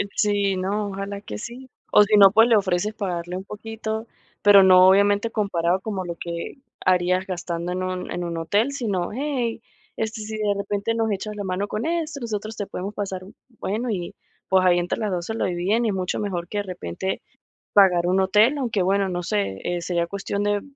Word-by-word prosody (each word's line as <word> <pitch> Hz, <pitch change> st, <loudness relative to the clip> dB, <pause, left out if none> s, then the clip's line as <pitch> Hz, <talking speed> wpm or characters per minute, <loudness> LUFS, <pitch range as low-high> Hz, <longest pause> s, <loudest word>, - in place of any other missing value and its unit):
Sí, 205 Hz, -2 st, +2 dB
no, 200 Hz, +3 st, -1 dB
ojalá 200 Hz, +1 st, -5 dB
que 105 Hz, -, -7 dB
sí. 255 Hz, +2 st, -8 dB, 0.2 s
O 210 Hz, -, +7 dB
si 210 Hz, +1 st, +3 dB
no, 195 Hz, -1 st, +8 dB
pues, 225 Hz, +2 st, +6 dB
le 230 Hz, -, +5 dB
ofreces 195 Hz, +1 st, +1 dB
pagarle 180 Hz, -3 st, -3 dB
un 190 Hz, -, -6 dB
poquito, 220 Hz, +2 st, -5 dB, 0.4 s
pero, 205 Hz, -1 st, +8 dB
no 185 Hz, -1 st, +7 dB
obviamente 205 Hz, +3 st, +4 dB
comparado 185 Hz, -4 st, 0 dB
como 195 Hz, -4 st, -4 dB
lo 170 Hz, -1 st, -4 dB
que 170 Hz, -, -6 dB, 0.3 s
harías 185 Hz, 0 st, +2 dB
gastando 175 Hz, -1 st, -4 dB
en 185 Hz, -, -3 dB
un 185 Hz, 0 st, -4 dB
en 175 Hz, -, -3 dB
un 170 Hz, -1 st, -4 dB
hotel, 205 Hz, +11 st, +1 dB
sino: 205 Hz, -10 st, -2 dB
"Ey, 250 Hz, -3 st, -2 dB, 0.4 s
este, 220 Hz, 0 st, -3 dB
si 215 Hz, 0 st, -5 dB
de 210 Hz, -1 st, +1 dB
repente 205 Hz, +2 st, -2 dB
nos 225 Hz, -1 st, 0 dB
echas 210 Hz, +2 st, -4 dB
la 205 Hz, -, -4 dB
mano 190 Hz, +2 st, -2 dB
con 215 Hz, +8 st, -3 dB
esto, 325 Hz, -4 st, -2 dB
nosotros 215 Hz, -2 st, -4 dB
te 205 Hz, -, -4 dB
podemos 195 Hz, +3 st, -5 dB
pasar 190 Hz, -3 st, -4 dB
un" 200 Hz, +5 st, -14 dB, 0.2 s
bueno, 230 Hz, +5 st, -2 dB
y 180 Hz, -5 st, -3 dB, 0.3 s
pues, 190 Hz, -1 st, +3 dB
ahí 175 Hz, -1 st, +5 dB
entre 175 Hz, +4 st, -1 dB
las 215 Hz, -2 st, -1 dB
2 175 Hz, -1 st, -2 dB
se 220 Hz, -, -4 dB
lo -, -, -1 dB
dividen, 190 Hz, +6 st, 0 dB
y 215 Hz, -, +1 dB
mucho 185 Hz, -1 st, -2 dB
mejor 180 Hz, -5 st, -3 dB
que 205 Hz, -, -3 dB
de -, -, -1 dB
repente 185 Hz, -, -4 dB, 0.5 s
pagar 180 Hz, -4 st, +5 dB
un 185 Hz, +1 st, +2 dB
hotel. 215 Hz, +9 st, +4 dB
Aunque, 230 Hz, -7 st, -1 dB
bueno, 195 Hz, +1 st, +2 dB
no 175 Hz, -1 st, -2 dB
sé, 100 Hz, -7 st, -1 dB
eh, 175 Hz, 0 st, -2 dB
sería 170 Hz, -1 st, -1 dB
cuestión 200 Hz, +1 st, -3 dB
de 205 Hz, -1 st, +1 dB
200 Hz, 210 wpm, -23 LUFS, 180-215 Hz, 0.5 s, no